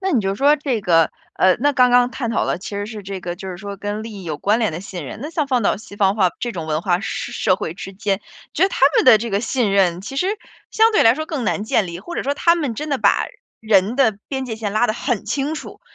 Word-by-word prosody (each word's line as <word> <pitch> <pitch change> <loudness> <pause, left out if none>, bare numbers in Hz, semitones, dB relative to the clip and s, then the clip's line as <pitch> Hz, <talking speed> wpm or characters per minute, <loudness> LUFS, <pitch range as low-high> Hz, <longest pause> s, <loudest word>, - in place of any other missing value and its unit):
那 385 0 -1
你 245 - +3
就 195 0 -1
说 285 +6 +4
这 270 -6 -2
个， 165 -4 +3 0.2
呃， 185 -1 +4
那 290 +1 +3
刚 250 -2 +4
刚 245 0 +4
探 235 -4 -3
讨 230 - 0
的 - - -1
其 190 - -8
实 205 - -2
是 215 -2 -8
这 190 -1 -6
个， 175 0 -4
就 190 +1 -8
是 180 - -6
说， 200 +1 -7
跟 205 +1 -4
利 225 0 -8
益 195 -3 -9
有 155 -3 -3
关 210 +8 +1
联 220 -5 +1
的 165 - -5
信 180 -6 -7
任， 175 - -8
那 300 - -5
像 310 -3 -1
放 250 -4 +1
到 - - +2
西 200 0 -12
方 195 -1 +3
化 190 -4 +3
这 240 - -3
种 165 -5 -5
文 155 +1 -1
化 180 -2 +1
社 200 - -4
社 185 - +1
会 160 - -4
之 195 +2 -9
间， 200 0 -1 0.3
觉 335 - 0
得 - - +2
他 - - -5 0.2
们 - - +4
的 240 - +9
这 230 +2 -4
个 200 0 +1
信 230 -2 0
任， 180 -3 +2
其 270 +7 -7
实 360 - +1 0.4
相 450 +1 +4
对 425 - +4
来 225 +1 +6
说 310 +3 -4
更 295 -7 -4
难 205 - -1
建 215 -2 +1
立， 170 0 -7
或 345 - -8
者 - - -2
说 280 +1 -1
他 335 +3 +3
们 290 -9 -2
真 300 +6 -5
的 275 - 0
把 205 -2 +3 0.4
人 215 0 +3
的 245 -7 +2
边 265 -2 -3
界 225 -2 -5
线 210 -2 -4
拉 230 +3 +3
得 215 - -1
很 240 -4 -2
清 280 +7 -1
楚， 310 - -9
215 Hz, 310 characters per minute, -20 LUFS, 195-265 Hz, 0.4 s, 的